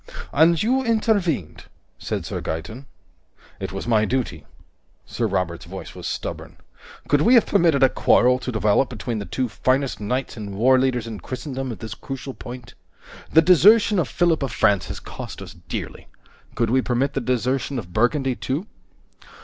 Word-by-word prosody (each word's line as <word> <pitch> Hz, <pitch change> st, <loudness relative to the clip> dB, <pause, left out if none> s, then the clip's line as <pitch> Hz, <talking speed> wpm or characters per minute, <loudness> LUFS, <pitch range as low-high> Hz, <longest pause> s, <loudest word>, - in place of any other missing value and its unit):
"And 160 Hz, +3 st, +4 dB
you 260 Hz, +4 st, +2 dB
intervened," 210 Hz, -, 0 dB, 0.3 s
said -, -, -4 dB
Sir -, -, -4 dB
Gaeton. 110 Hz, -, -6 dB, 0.7 s
"It -, -, -5 dB
was -, -, -5 dB
my 110 Hz, -3 st, +3 dB
duty." 115 Hz, -, -2 dB, 0.6 s
Sir -, -, -2 dB
Robert's 90 Hz, -3 st, -2 dB
voice -, -, -8 dB
was -, -, -7 dB
stubborn. -, -, -5 dB, 0.5 s
"Could 145 Hz, 0 st, +3 dB
we 240 Hz, +10 st, +5 dB
have 235 Hz, -, +6 dB
permitted 160 Hz, -5 st, +3 dB
a 135 Hz, -, +7 dB
quarrel 125 Hz, +1 st, +3 dB
to 130 Hz, -, -4 dB
develop 110 Hz, +3 st, +2 dB
between 115 Hz, -1 st, -4 dB
the 100 Hz, -, -6 dB
two 130 Hz, -1 st, -1 dB
finest 130 Hz, +4 st, 0 dB
knights 125 Hz, +6 st, -2 dB
and 105 Hz, -3 st, -7 dB
warleaders 130 Hz, +1 st, +3 dB
in 110 Hz, -3 st, -6 dB
Christendom 130 Hz, -1 st, -5 dB
at 115 Hz, -, -8 dB
this 110 Hz, -2 st, -6 dB
crucial 135 Hz, +3 st, -7 dB
point? 125 Hz, -1 st, -10 dB, 0.6 s
The 160 Hz, -, +6 dB
desertion 205 Hz, +4 st, +6 dB
of 160 Hz, -, 0 dB
Philip 170 Hz, 0 st, +1 dB
of 135 Hz, -4 st, -2 dB
France 100 Hz, -3 st, +2 dB
has -, -, -6 dB
cost -, -, -8 dB
us -, -, -9 dB
dearly. -, -, -7 dB, 0.5 s
Could 115 Hz, -2 st, 0 dB
we 130 Hz, +1 st, +3 dB
permit 125 Hz, +3 st, 0 dB
the 135 Hz, -, -1 dB
desertion 130 Hz, +2 st, -1 dB
of 90 Hz, -7 st, -7 dB
Burgundy, 130 Hz, -, +1 dB
too?" 140 Hz, -, -3 dB
130 Hz, 165 wpm, -22 LUFS, 115-145 Hz, 0.7 s, a